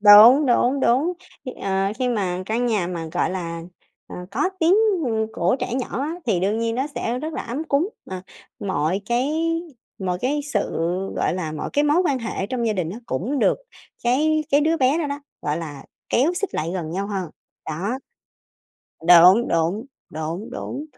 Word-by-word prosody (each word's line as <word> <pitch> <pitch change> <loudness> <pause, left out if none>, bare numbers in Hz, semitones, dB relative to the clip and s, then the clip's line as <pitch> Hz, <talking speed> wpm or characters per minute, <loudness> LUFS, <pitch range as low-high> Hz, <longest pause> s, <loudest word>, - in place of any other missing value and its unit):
đúng, 220 +8 +9
đúng, 250 +2 +3
đúng. 275 +10 +3 0.3
Khi, 255 - -5
ờ, 195 +1 0
khi 255 -1 +1
mà 185 -6 -1
căn 235 +3 0
nhà 210 -7 +1
mà, 170 -2 -4
gọi - - +1
là, 170 -3 -4 0.4
ờ, - - -9
có 375 - 0
tiếng, 335 +4 +5 0.3
ừm, 220 -1 0
của 180 +9 +1
trẻ 245 - -2
nhỏ 255 -1 -2
á, 310 +3 -2
thì 190 -6 +2
đương 205 +4 +1
nhiên 230 0 0
nó 265 +3 0
sẽ 240 +2 -2
rất 310 +4 -4
là - - -3
ấm 265 +7 -4
cúng, 320 +5 +1 0.2
à, 185 -1 -5 0.4
mọi 185 -1 0
cái 250 +5 +1 0.7
mọi 180 -2 -2
cái 290 +4 0
sự, - - +1 0.5
gọi - - +1
là, 160 -4 -3
mọi 155 - -4
cái 290 +1 +2
mối 305 +5 +4
quan 270 - +1
hệ 225 -4 -3
trong 240 0 -2
gia 220 - +2
đình 175 -4 -2
á 220 - -6
cũng 235 - -2
được - - +3 0.5
cái 305 +5 +2
cái 285 +1 +5
đứa 320 +2 +2
bé 270 +3 +3
đó 310 - 0
đó, 285 +1 -4 0.2
gọi 150 +1 -1
là, 145 -4 -7 0.2
kéo 280 +8 +3
xích 405 +2 -3
lại 160 +2 -1
gần 165 -4 -3
nhau 195 +3 -2
hơn, 190 -6 -3 0.4
đó. 195 +11 -2 1.1
Đúng, 180 +7 +8
đúng, 170 - 0 0.2
đúng, 165 +9 -5
đúng. 285 +3 -5
225 Hz, 190 wpm, -23 LUFS, 180-270 Hz, 1.1 s, đúng